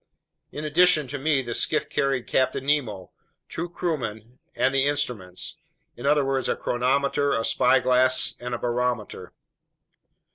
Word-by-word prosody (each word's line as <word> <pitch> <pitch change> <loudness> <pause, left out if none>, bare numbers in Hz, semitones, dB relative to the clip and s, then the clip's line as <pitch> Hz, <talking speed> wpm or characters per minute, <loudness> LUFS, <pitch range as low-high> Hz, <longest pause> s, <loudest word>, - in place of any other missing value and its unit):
In 150 +1 -6
addition 155 -2 +4
to 145 +1 -5
me, 140 -1 +1
the 120 -1 -4
skiff 155 +6 0
carried 135 -3 -1
Captain 130 0 0
Nemo, 120 -11 -1 0.4
two 175 +1 -5
crewmen, 125 - -4 0.2
and 135 - +1
the 135 0 +2
instruments—in 120 - -5
other 145 -1 +3
words, 135 -1 -1
a - - +1
chronometer, 140 +3 0
a 115 - 0
spyglass, 130 0 +3
and 125 0 -4
a - - -3
barometer. 120 -2 -2
130 Hz, 135 wpm, -25 LUFS, 120-145 Hz, 0.4 s, addition